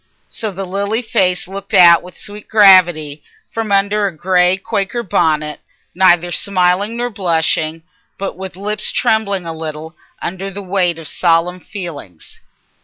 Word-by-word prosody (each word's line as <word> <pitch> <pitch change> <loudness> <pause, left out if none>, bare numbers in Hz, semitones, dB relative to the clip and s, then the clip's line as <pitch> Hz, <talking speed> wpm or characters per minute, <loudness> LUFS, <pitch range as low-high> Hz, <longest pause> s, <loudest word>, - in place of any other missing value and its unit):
So 220 - -3
the 195 0 -5
lily 200 +5 -1
face 190 -7 0
looked 195 +1 -5
out 170 -2 +7
with 180 - -14
sweet 205 0 -9
gravity 175 -8 +4 0.3
from 225 -2 -4
under 200 +1 +2
a 175 -5 -7
grey 180 +2 +2
Quaker 200 +4 -3
bonnet, 155 -5 0 0.3
neither 175 -1 +3
smiling 190 +4 0
nor 245 0 -2
blushing, 165 -4 -1 0.3
but 195 - -4
with 190 0 -8
lips 210 +3 -2
trembling 200 -4 0
a 165 - -3
little 160 0 -7 0.2
under 190 +2 -5
the 200 +1 -8
weight 180 -3 0
of 165 -2 -8
solemn 175 +2 +1
feelings. 160 - -9
185 Hz, 145 wpm, -16 LUFS, 170-200 Hz, 0.3 s, out